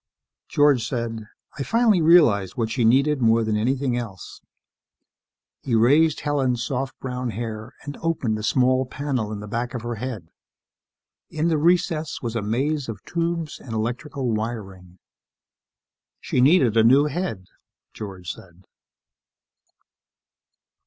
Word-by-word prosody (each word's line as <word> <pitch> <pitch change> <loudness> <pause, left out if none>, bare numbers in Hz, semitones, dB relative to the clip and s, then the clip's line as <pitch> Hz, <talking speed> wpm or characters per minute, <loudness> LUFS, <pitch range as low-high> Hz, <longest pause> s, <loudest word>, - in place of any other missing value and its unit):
_ - - -52
George 145 -5 +3
said, 115 -4 -4 0.3
"I - - -1
finally 225 - +3
realized 150 - +4
what 115 -2 -1
she 120 0 0
needed 135 +5 +3
more 115 0 +4
than 110 -1 0
anything 130 +3 0
else 110 -8 -7 0.6
..." - - -62
He 120 - -1
raised 145 +8 +4
Helen's 130 -5 0
soft 135 +1 -3
brown 125 -1 -4
hair 110 +2 -6
and 145 -1 -6
opened 135 -10 -1
a - - -5
small 130 +3 +2
panel 130 -6 -3
in 105 -1 -5
the 105 - -8
back 120 +4 -3
of 120 - -5
her 120 -1 -4
head. 110 -10 -5 1.0
In 160 +2 -1
the 160 - +2
recess 165 -2 +1
was 120 -2 -4
a 115 - 0
maze 130 +6 -1
of 105 -3 -7
tubes 170 -2 -2
and 120 - -9
electrical 125 +3 -3
wiring. 100 -5 -5 1.2
"She 125 - 0
needed 135 - +4
a 110 - +6
new 135 +6 +5
head," 150 - -3 0.5
George 95 -4 -8
said. 90 0 -15
125 Hz, 140 wpm, -23 LUFS, 110-145 Hz, 1.2 s, a